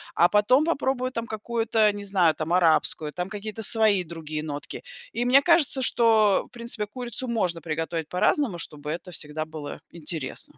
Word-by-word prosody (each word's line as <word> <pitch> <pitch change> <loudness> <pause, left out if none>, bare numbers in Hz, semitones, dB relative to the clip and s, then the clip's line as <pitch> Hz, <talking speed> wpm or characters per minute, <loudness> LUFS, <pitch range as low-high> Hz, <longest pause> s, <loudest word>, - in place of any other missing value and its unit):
А 175 - +4
потом 250 +8 +3
попробую, 265 -5 -1
там, 230 -2 -4
какую-то, 220 0 0
э, - - +1
не 205 0 -7
знаю, 185 -5 +3
там, 155 +2 -3
арабскую, 160 -3 +2
там 180 +1 -4
какие-то 215 +1 -6
свои 215 -3 +4
другие 155 -2 -6
нотки. 145 -2 -7 0.3
И 240 +2 -2
мне 260 +3 +6
кажется, 310 -6 +3
что, 220 -5 +3
в - - -28
принципе, 235 -3 -2
курицу 245 +2 -5
можно 180 -8 -1
приготовить 160 +1 -4
по-разному, 190 +3 +1
чтобы 150 -3 -5
это 175 +3 -6
всегда 155 0 -2
было 155 -2 -8
интересно. 160 -4 -4
200 Hz, 170 wpm, -25 LUFS, 160-235 Hz, 0.3 s, мне